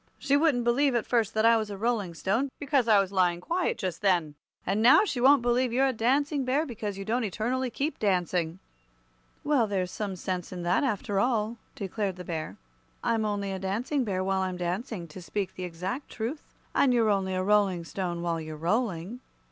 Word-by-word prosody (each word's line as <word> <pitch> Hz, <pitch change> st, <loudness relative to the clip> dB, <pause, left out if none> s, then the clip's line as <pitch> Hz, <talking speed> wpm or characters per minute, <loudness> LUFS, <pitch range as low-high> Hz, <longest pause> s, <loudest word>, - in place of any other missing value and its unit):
She 280 Hz, -, +1 dB
wouldn't 285 Hz, -5 st, +3 dB
believe, 255 Hz, +3 st, +2 dB
at 235 Hz, -, +1 dB
first, 225 Hz, -3 st, +1 dB
that 220 Hz, +1 st, +3 dB
I 230 Hz, 0 st, +6 dB
was 215 Hz, -1 st, -2 dB
a 200 Hz, -, -6 dB
Rolling 210 Hz, -5 st, -1 dB
Stone, 225 Hz, -, 0 dB
because 280 Hz, -4 st, +1 dB
I 215 Hz, -3 st, +6 dB
was 195 Hz, -1 st, 0 dB
lying 180 Hz, -3 st, +2 dB
quiet 345 Hz, -, -1 dB
just 185 Hz, -5 st, -4 dB
then. 175 Hz, -7 st, +2 dB, 0.3 s
And 200 Hz, +3 st, 0 dB
now 255 Hz, -, +7 dB
she 255 Hz, -, -2 dB
won't 270 Hz, 0 st, +6 dB
believe 245 Hz, +1 st, +2 dB
you're 260 Hz, +3 st, +3 dB
a 265 Hz, -, +1 dB
Dancing 275 Hz, +5 st, +1 dB
Bear, 270 Hz, +5 st, +1 dB
because 210 Hz, -7 st, -5 dB
you 195 Hz, -, -6 dB
don't 235 Hz, +4 st, 0 dB
eternally 240 Hz, +5 st, -1 dB
keep 285 Hz, +6 st, -3 dB
dancing." 180 Hz, -4 st, 0 dB, 0.9 s
"Well, 285 Hz, -6 st, +2 dB
there's 185 Hz, -3 st, -1 dB
some 200 Hz, -3 st, -4 dB
sense 180 Hz, -1 st, -4 dB
in 180 Hz, -1 st, -5 dB
that, 180 Hz, +11 st, +2 dB
after 205 Hz, -5 st, -1 dB
all," 225 Hz, 0 st, 0 dB, 0.2 s
declared 200 Hz, -1 st, -3 dB
the 180 Hz, -, -8 dB
Bear. 160 Hz, -2 st, -4 dB, 0.5 s
"I'm 225 Hz, -1 st, +1 dB
only 200 Hz, -2 st, -2 dB
a 190 Hz, -, -4 dB
Dancing 230 Hz, +9 st, -1 dB
Bear 190 Hz, -4 st, -1 dB
while 190 Hz, 0 st, 0 dB
I'm 185 Hz, -1 st, -2 dB
dancing, 180 Hz, +1 st, -3 dB
to 175 Hz, +4 st, -10 dB
speak 195 Hz, +2 st, -3 dB
the 185 Hz, -, -5 dB
exact 185 Hz, -, -5 dB
truth; 245 Hz, +7 st, -4 dB, 0.3 s
and 255 Hz, -3 st, +3 dB
you're 225 Hz, -3 st, +3 dB
only 190 Hz, -2 st, 0 dB
a 185 Hz, -, 0 dB
Rolling 195 Hz, -3 st, +2 dB
Stone 175 Hz, -1 st, -3 dB
while 165 Hz, -1 st, -1 dB
you're 155 Hz, -1 st, -7 dB
rolling." 195 Hz, +3 st, -1 dB
210 Hz, 205 wpm, -28 LUFS, 185-245 Hz, 0.9 s, now